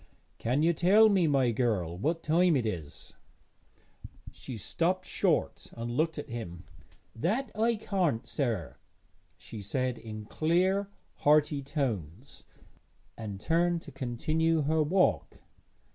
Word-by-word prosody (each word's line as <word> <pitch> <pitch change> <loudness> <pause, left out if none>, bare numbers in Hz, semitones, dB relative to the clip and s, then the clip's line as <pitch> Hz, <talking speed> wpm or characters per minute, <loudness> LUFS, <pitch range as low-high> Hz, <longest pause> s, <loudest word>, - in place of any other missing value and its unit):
'Can 125 +6 +1
you 170 +1 +4
tell 200 +7 +5
me, 190 -5 +3
my 135 -4 +3
girl, 105 -8 0
what 160 - -1
time 170 +1 +3
it 125 -4 +1
is?' 85 -9 -5 1.2
She 125 - -8
stopped 180 - -1
short - - -1
and 115 +1 -4
looked 160 +6 0
at 145 - -5
him. 90 -9 -7 0.5
'That 215 - -1
I 230 +2 +2
can't, 180 - -1
sir,' 110 - -2 0.6
she 110 - -9
said 125 +4 -2
in 110 -1 -8
clear 185 - +1 0.3
hearty 150 -1 +3
tones, 125 - -4 0.7
and 105 -4 -6
turned 170 - +1
to 145 - -11
continue 155 +6 0
her 155 +2 +2
walk. 180 +5 +1
145 Hz, 125 wpm, -29 LUFS, 115-170 Hz, 1.2 s, tell